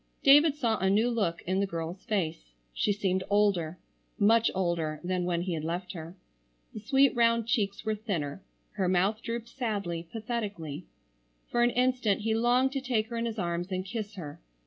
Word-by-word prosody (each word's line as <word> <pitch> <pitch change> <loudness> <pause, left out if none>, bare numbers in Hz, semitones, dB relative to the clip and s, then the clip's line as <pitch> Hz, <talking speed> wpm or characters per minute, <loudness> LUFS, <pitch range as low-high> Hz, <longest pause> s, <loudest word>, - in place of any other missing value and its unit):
David 290 +2 +7
saw 235 -7 0
a 190 +1 +2
new 220 +5 +3
look 200 -8 -1
in 185 +2 0
the 200 - +1
girl's 170 +1 -5
face. 160 - -2 0.2
She 205 - +1
seemed 190 -2 0
older, 195 -5 +2 0.4
much 225 +2 +4
older 170 -4 -1
than 180 0 -1
when 175 -1 0
he 180 -1 -2
had 155 -2 -3
left 175 +3 -3
her. 165 0 -8 0.6
The - - -6
sweet 270 +5 +3
round 230 -1 +3
cheeks 210 -4 -1
were 220 - +1
thinner, 190 -8 -3 0.3
her 190 -3 0
mouth 195 +4 +2
drooped 235 0 -4
sadly, 200 -9 -3
pathetically. 205 -9 -4 0.6
For 240 - +2
an 240 - +5
instant 245 -4 +1
he 220 +1 0
longed 245 +3 +3
to 275 -1 -2
take 240 -4 0
her 235 - -4
in 230 0 -1
his 225 -1 -5
arms 175 0 -2
and 185 0 -2
kiss 215 0 -5
her. 150 -6 -8
205 Hz, 185 wpm, -29 LUFS, 175-230 Hz, 0.6 s, David